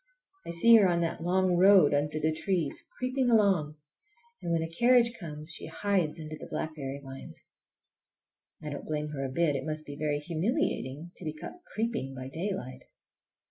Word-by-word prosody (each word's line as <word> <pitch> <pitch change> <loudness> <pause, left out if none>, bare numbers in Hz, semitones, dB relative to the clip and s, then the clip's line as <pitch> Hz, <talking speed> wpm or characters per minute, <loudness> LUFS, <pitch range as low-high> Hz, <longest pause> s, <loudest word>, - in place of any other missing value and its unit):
I - - -5
see 225 +8 +7
her 205 -3 +5
on 170 -1 +1
that 165 -1 -2
long 180 +1 +2
road 185 -5 +6
under 150 +2 0
the 155 +1 +1
trees, 165 -3 -2
creeping 255 0 0
along, 195 -10 +3 0.7
and 170 - -3
when 165 -1 +1
a - - -3
carriage 235 +7 +4
comes 155 -2 -6
she 155 - -1
hides 175 -2 0
under 155 -1 -6
the - - -10
blackberry 140 -3 -4
vines. 135 0 -11 1.2
I 150 - -5
don't 145 - -6
blame 150 -1 -2
her 140 -2 -4
a 135 - -2
bit. 150 +2 +1
It - - -2
must 155 0 -4
be 145 - -7
very 150 0 -1
humiliating 170 - -2
to - - -9
be 155 -2 -3
caught 355 - -10
creeping 220 - -2
by 130 0 -6
daylight! 165 -5 -5
160 Hz, 180 wpm, -29 LUFS, 150-190 Hz, 1.2 s, see